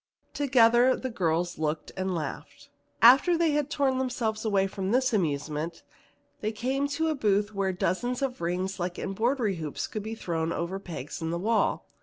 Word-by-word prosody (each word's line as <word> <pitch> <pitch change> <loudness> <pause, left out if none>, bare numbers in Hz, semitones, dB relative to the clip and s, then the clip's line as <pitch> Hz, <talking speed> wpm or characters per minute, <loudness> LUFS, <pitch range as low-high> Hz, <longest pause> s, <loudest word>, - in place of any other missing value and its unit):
Together 250 -2 +4
the 260 - -5
girls 175 -4 -1
looked 155 0 -2
and 190 -1 -2
laughed. 155 -3 -6 0.3
After 270 +9 +7
they 330 -2 +2
had 295 -1 0
torn 270 -3 +1
themselves 235 -4 -2
away 200 -3 +2
from 195 -1 -3
this 255 +2 +2
amusement, 155 -2 -2 0.6
they 215 - -2
came 260 +6 -1
to 320 +3 -1
a - - +1
booth 210 -5 +1
where 195 -1 0
dozens 245 +9 -1
of 260 -6 -3
rings 185 +3 -2
like 175 0 -3
embroidery 220 0 0
hoops 155 -3 -4
could 215 - -5
be 220 +2 -5
thrown 165 -5 -2
over 170 +4 -3
pegs 165 -7 -7
in 160 - -2
the 170 - -1
wall. 220 +5 +1
210 Hz, 175 wpm, -28 LUFS, 175-255 Hz, 0.6 s, After